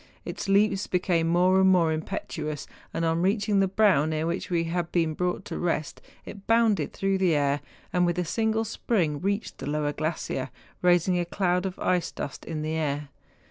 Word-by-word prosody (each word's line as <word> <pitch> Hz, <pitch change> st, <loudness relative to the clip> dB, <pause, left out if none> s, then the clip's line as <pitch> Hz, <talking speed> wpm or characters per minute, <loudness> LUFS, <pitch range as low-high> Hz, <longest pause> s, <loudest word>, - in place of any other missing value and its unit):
Its -, -, -5 dB
leaps 200 Hz, 0 st, +3 dB
became 175 Hz, -2 st, +1 dB
more 180 Hz, +3 st, +4 dB
and 190 Hz, -, +5 dB
more 175 Hz, -4 st, +4 dB
impetuous, 155 Hz, -2 st, -4 dB, 0.3 s
and 165 Hz, -, -1 dB
on 165 Hz, +1 st, +1 dB
reaching 205 Hz, +2 st, +2 dB
the 195 Hz, -, +3 dB
brow 195 Hz, -6 st, +4 dB
near 155 Hz, 0 st, -1 dB
which 170 Hz, +2 st, -3 dB
we 170 Hz, -2 st, +1 dB
had 170 Hz, 0 st, -2 dB
been 165 Hz, -3 st, +1 dB
brought 180 Hz, +2 st, -2 dB
to -, -, -5 dB
rest 165 Hz, -3 st, -2 dB, 0.2 s
it 200 Hz, -1 st, -10 dB
bounded 225 Hz, -8 st, +3 dB
through 195 Hz, 0 st, 0 dB
the 180 Hz, -4 st, +3 dB
air, 145 Hz, 0 st, +1 dB, 0.3 s
and 180 Hz, -1 st, +3 dB
with 175 Hz, 0 st, +1 dB
a 180 Hz, -, 0 dB
single 220 Hz, +4 st, 0 dB
spring 180 Hz, -9 st, 0 dB
reached 200 Hz, +3 st, -2 dB
the -, -, -4 dB
lower 150 Hz, 0 st, -1 dB
glacier, 155 Hz, -4 st, -3 dB, 0.3 s
raising 180 Hz, 0 st, +3 dB
a -, -, +1 dB
cloud 180 Hz, +1 st, 0 dB
of 185 Hz, -, -7 dB
ice 180 Hz, -2 st, 0 dB
dust 140 Hz, -, -6 dB
in 155 Hz, -2 st, -4 dB
the 155 Hz, +1 st, -2 dB
air. 150 Hz, -2 st, -2 dB
175 Hz, 190 wpm, -26 LUFS, 160-195 Hz, 0.3 s, and